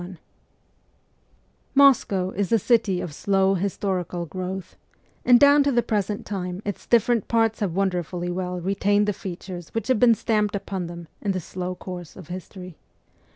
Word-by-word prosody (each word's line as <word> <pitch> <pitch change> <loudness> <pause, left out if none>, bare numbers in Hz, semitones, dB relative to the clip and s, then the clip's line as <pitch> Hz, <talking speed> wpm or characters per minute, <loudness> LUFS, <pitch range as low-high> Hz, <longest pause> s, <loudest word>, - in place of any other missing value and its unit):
B 180 +1 -9 1.6
Moscow 220 -9 +4
is 200 +1 -2
a 230 - +5
city 220 -4 +2
of 160 - -6
slow 195 +3 +2
historical 185 -2 -2
growth, 185 +2 -6 0.5
and 245 -1 +6
down 285 +1 +7
to 280 0 +2
the 240 -2 +2
present 210 -2 -2
time 180 -3 -4
its 205 -2 -5
different 235 -1 +3
parts 225 -1 +1
have 190 -5 -2
wonderfully 180 -2 -1
well 180 0 -3
retained 200 +3 +1
the 210 - +1
features 180 -2 -7
which 225 +1 -2
have 255 -4 +3
been 240 -2 +6
stamped 210 -1 0
upon 190 -2 -4
them 170 -1 -9
in 200 -2 0
the 185 - -2
slow 180 +1 -5
course 180 -3 -8
of 185 -5 -12
history. 185 -1 -8
190 Hz, 160 wpm, -24 LUFS, 180-210 Hz, 1.6 s, down